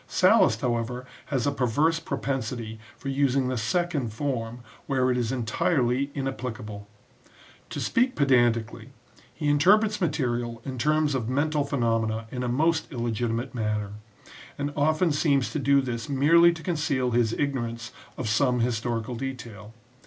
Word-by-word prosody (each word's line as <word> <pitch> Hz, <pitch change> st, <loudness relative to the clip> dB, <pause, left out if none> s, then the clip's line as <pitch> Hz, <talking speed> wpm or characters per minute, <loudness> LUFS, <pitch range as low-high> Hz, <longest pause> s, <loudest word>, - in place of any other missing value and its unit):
Sallust, -, -, +4 dB
however, 125 Hz, +1 st, -2 dB, 0.2 s
has 130 Hz, -4 st, -1 dB
a 145 Hz, -, +2 dB
perverse 145 Hz, +5 st, +1 dB
propensity 125 Hz, -9 st, -4 dB, 0.2 s
for 135 Hz, -, -6 dB
using 135 Hz, -1 st, +1 dB
the 130 Hz, -, -1 dB
second 140 Hz, +2 st, -1 dB
form 120 Hz, -1 st, -3 dB, 0.3 s
where 130 Hz, -2 st, +2 dB
it -, -, +1 dB
is 120 Hz, -1 st, -1 dB
entirely 130 Hz, +2 st, 0 dB
inapplicable. 120 Hz, -6 st, -5 dB, 0.8 s
To -, -, -5 dB
speak 250 Hz, +2 st, +1 dB
pedantically, 120 Hz, -4 st, +2 dB, 0.4 s
he 150 Hz, -, -4 dB
interprets 205 Hz, +9 st, +4 dB
material 120 Hz, -8 st, -1 dB
in 130 Hz, -2 st, -5 dB
terms 150 Hz, +2 st, +2 dB
of 120 Hz, -3 st, -2 dB
mental 145 Hz, +3 st, +1 dB
phenomena 115 Hz, -5 st, 0 dB
in 125 Hz, -, -4 dB
a 125 Hz, -, -1 dB
most 160 Hz, +8 st, +1 dB
illegitimate 120 Hz, -1 st, -2 dB
manner, 105 Hz, -3 st, -2 dB, 0.7 s
and 145 Hz, 0 st, -3 dB
often 155 Hz, +3 st, +2 dB
seems 145 Hz, -3 st, +1 dB
to 150 Hz, -, -2 dB
do 140 Hz, 0 st, +4 dB
this 120 Hz, -3 st, -4 dB
merely 165 Hz, +5 st, +5 dB
to 165 Hz, -1 st, -8 dB
conceal 145 Hz, -7 st, 0 dB
his 115 Hz, -1 st, +2 dB
ignorance 120 Hz, -5 st, -3 dB, 0.3 s
of 120 Hz, -, -3 dB
some 125 Hz, +2 st, +2 dB
historical 115 Hz, 0 st, -1 dB
detail. 120 Hz, -5 st, -7 dB
130 Hz, 140 wpm, -26 LUFS, 115-145 Hz, 0.8 s, merely